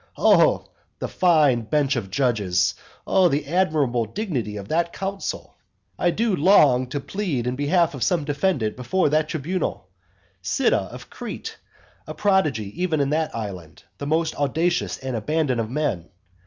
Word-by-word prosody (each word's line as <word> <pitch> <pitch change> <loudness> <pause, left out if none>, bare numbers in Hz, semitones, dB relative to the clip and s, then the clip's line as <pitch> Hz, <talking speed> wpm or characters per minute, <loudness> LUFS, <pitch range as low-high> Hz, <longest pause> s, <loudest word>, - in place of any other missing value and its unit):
Oh - - +4 0.3
the - - -4
fine 155 -9 +3
bench 140 +4 0
of 110 -6 -3
judges! 100 -7 +1 0.3
Oh 185 -2 +4
the 145 0 -1
admirable 150 -8 +1
dignity 120 - -3
of 100 -1 -7
that 170 +1 0
council! 195 0 -5 0.4
I 175 - +3
do 220 +3 +1
long 145 -7 +5
to 140 +3 -3
plead 145 - -3
in 125 +1 -1
behalf 165 +4 +2
of 135 - -7
some 155 +6 +1
defendant 145 - 0
before 145 +7 0
that 155 +1 +1
tribunal 160 - -3 0.5
Cyda 90 -1 +1
of - - -11
Crete; - - -7 0.5
a 155 - -6
prodigy 155 - 0
even 165 -4 +1
in 140 0 +1
that 155 +1 -1
island; 95 -8 -7 0.2
the 140 - -4
most 160 +2 +1
audacious 160 +5 0
and 130 -2 -5
abandoned 130 +1 0
of 110 - -4
men. 125 - -2
145 Hz, 155 wpm, -23 LUFS, 120-170 Hz, 0.5 s, long